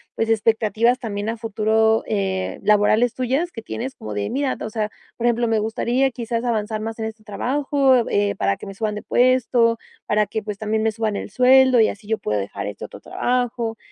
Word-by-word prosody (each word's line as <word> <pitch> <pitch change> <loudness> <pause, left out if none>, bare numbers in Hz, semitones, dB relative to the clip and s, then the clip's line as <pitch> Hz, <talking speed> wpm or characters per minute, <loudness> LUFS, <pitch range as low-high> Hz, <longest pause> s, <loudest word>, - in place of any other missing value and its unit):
pues, 225 - -1
expectativas 225 +2 +2
también 205 -2 -4
a 230 - -2
futuro, 220 0 +1
eh, 190 -3 -2
laborales 210 +3 +3
tuyas 265 +8 -1
que 225 - -8
tienes 250 +4 -5
como 105 - -7
de 100 0 -2
mira, 270 0 -1
o - - -3
sea, 215 -1 -2 0.3
por 235 - -3
ejemplo: 235 0 +1
"Me 225 - +2
gustaría 240 +4 0
quizás 235 0 -3
avanzar 215 -2 -1
más 225 +1 -5
en 220 - -2
este 220 0 -7
trabajo, 265 +3 +1
eh, 205 -1 +1
para 100 0 +1
que - - -10
me 195 - -7
suban 210 +1 -2
de 210 - -6
puesto, 245 -2 +3 0.3
para 210 0 +2
que, 220 +2 -3
pues, 210 -1 -5
también 215 +1 -1
me 220 0 +1
suban 215 -2 -2
el - - -6
sueldo 255 +3 +5
y 220 - +4
así 205 0 -9
yo 220 0 0
pueda 105 -1 -1
dejar 100 0 -5
este 105 - -6
otro - - -11
trabajo", 245 -2 -1
225 Hz, 205 wpm, -22 LUFS, 210-245 Hz, 0.3 s, sueldo